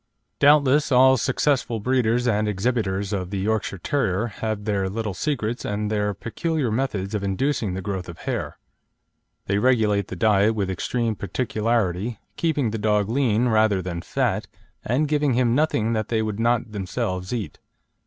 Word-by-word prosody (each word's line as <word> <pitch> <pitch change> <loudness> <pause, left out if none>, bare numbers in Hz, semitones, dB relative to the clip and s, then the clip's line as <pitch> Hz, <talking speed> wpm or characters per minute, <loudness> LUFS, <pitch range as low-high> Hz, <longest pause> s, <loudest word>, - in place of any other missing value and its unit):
Doubtless 145 0 +4
all 130 +1 +6
successful 125 -2 0
breeders 125 +1 +1
and 105 -2 +1
exhibitors 100 -2 -1
of 90 -3 -2
the 100 - -3
Yorkshire 100 0 -1
Terrier 110 -1 0 0.2
have 110 -2 -2
their 100 -3 0
little 110 0 -3
secrets 120 - -2
and 105 +1 -2
their 105 -1 0
peculiar 135 - -2
methods 110 -5 -2
of 105 - -1
inducing 105 0 -1
the 95 - -5
growth 95 -3 -4
of 85 - -9
hair. - - -4 0.9
They 100 +1 +1
regulate 105 -5 +2
the - - -6
diet 105 +2 +3
with 100 -3 -1
extreme 115 +4 -1
particularity, 110 -1 -1 0.2
keeping 145 -8 0
the 110 - -3
dog 105 -1 +1
lean 120 -2 +2
rather 110 -3 +3
than 90 -2 -4
fat, - - -1 0.4
and 135 +7 +1
giving 145 -3 +1
him 120 -2 +2
nothing 120 -6 +1
that 110 -1 -1
they 110 -2 0
would 110 -1 -3
not 120 -1 +1
themselves 95 -2 -3
eat. 110 -10 -4
110 Hz, 160 wpm, -23 LUFS, 100-125 Hz, 0.9 s, all